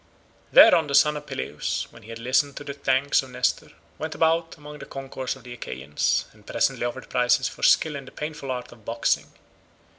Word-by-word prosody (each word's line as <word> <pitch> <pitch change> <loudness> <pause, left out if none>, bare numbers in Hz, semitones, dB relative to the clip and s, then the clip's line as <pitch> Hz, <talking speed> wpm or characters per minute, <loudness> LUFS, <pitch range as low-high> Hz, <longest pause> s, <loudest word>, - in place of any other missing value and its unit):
Thereon 165 - +8
the 140 - 0
son 150 +2 +5
of 150 0 -7
Peleus, 130 - -3
when 115 - -15
he 110 - -15
had 115 - -6
listened 130 +4 +1
to - - -6
all - - -20
the 140 - -5
thanks 140 0 +2
of 135 - -11
Nestor, 125 0 -1 0.3
went 155 0 -4
about 165 +1 +1
among 150 0 -11
the - - -9
concourse 135 -1 -5
of 130 - -16
the 120 - -9
Achaeans, 70 - -1
and - - -21
presently - - 0
offered 130 +2 -7
prizes 125 +1 +2
for - - -9
skill 155 -2 +4
in 140 -1 -7
the - - -12
painful 150 -2 -6
art 125 -1 -4
of 115 -3 -16
boxing. 115 +2 0
135 Hz, 210 wpm, -25 LUFS, 125-150 Hz, 0.3 s, Thereon